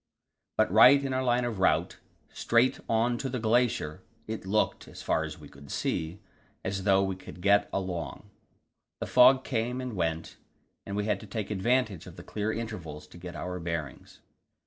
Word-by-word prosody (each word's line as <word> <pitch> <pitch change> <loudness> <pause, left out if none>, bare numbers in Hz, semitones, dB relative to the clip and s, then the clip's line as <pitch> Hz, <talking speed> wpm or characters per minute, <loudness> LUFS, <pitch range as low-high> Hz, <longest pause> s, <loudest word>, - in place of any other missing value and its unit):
But - - +3
right 125 +7 +8
in 135 - -2
our 130 0 0
line 125 -1 +2
of 115 -5 -3
route 85 -2 +2 0.3
straight 120 +2 +2
on 115 +1 +2
to 135 - -3
the 125 - -2
glacier 110 -9 +1 0.2
it 110 -3 -6
looked, 105 +2 0
as - - -10
far - - +1
as - - -7
we - - -12
could 70 0 -13
see, 80 +4 -2 0.5
as 95 0 -3
though 95 -1 +4
we 95 -1 -1
could 95 - -11
get 100 +2 +3
along. 90 -3 -4 0.7
The - - -3
fog 130 +1 +6
came 125 +1 -2
and 125 -3 -4
went, 80 -2 -2 0.5
and 100 - -4
we 105 0 -1
had 105 -3 0
to 105 - -11
take 105 0 -4
advantage 110 -2 0
of - - -11
the - - -10
clear 105 +1 -2
intervals 90 -10 -6
to 85 - -13
get 85 -1 -8
our 90 +4 -4
bearings. 80 -5 -5
105 Hz, 185 wpm, -29 LUFS, 90-120 Hz, 0.7 s, right